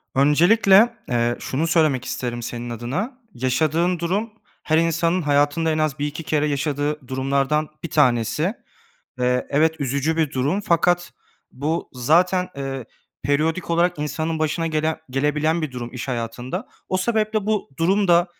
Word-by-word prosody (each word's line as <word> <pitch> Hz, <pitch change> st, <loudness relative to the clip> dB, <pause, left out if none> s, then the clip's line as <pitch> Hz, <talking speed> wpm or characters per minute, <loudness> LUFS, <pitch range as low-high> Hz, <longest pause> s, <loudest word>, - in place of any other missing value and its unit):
Öncelikle, 195 Hz, -, +5 dB
eee, 120 Hz, 0 st, +1 dB
şunu 155 Hz, +5 st, -2 dB
söylemek 155 Hz, -7 st, +2 dB
isterim 120 Hz, -1 st, -3 dB
senin 120 Hz, +1 st, -5 dB
adına. 140 Hz, -, -4 dB, 0.2 s
Yaşadığın 155 Hz, +8 st, +1 dB
durum 195 Hz, +7 st, -1 dB, 0.3 s
her 155 Hz, -, +2 dB
insanın 165 Hz, +2 st, +1 dB
hayatında 145 Hz, +2 st, +2 dB
en 155 Hz, -, 0 dB
az 155 Hz, -2 st, 0 dB
1-2 150 Hz, +2 st, -3 dB
kere 150 Hz, 0 st, +1 dB
yaşadığı 145 Hz, -1 st, -2 dB
durumlardan 140 Hz, +3 st, 0 dB
bir 170 Hz, -, -4 dB
tanesi. 145 Hz, -, +2 dB, 0.7 s
Eee, 125 Hz, 0 st, +1 dB
evet, 160 Hz, +3 st, +3 dB
üzücü 140 Hz, +4 st, 0 dB
bir 160 Hz, -4 st, +1 dB
durum 145 Hz, +10 st, 0 dB
fakat 175 Hz, -2 st, +1 dB, 0.4 s
bu 155 Hz, +6 st, -2 dB
zaten, 175 Hz, +8 st, +2 dB
eee, 135 Hz, -2 st, -4 dB, 0.4 s
periyodik 155 Hz, +6 st, 0 dB
olarak 175 Hz, -1 st, +2 dB
insanın 155 Hz, +2 st, -2 dB
başına 155 Hz, +2 st, 0 dB
gelen 160 Hz, 0 st, 0 dB
gelebilen 150 Hz, +4 st, +1 dB
bir 150 Hz, -, -3 dB
durum 120 Hz, -1 st, -6 dB
iş 125 Hz, +1 st, -6 dB
hayatında. 120 Hz, 0 st, -4 dB, 0.2 s
O 185 Hz, -, 0 dB
sebeple 215 Hz, +1 st, 0 dB
bu 215 Hz, -8 st, -1 dB
durum 190 Hz, +4 st, +2 dB
da, 175 Hz, +1 st, +5 dB
155 Hz, 145 wpm, -22 LUFS, 135-170 Hz, 0.7 s, Öncelikle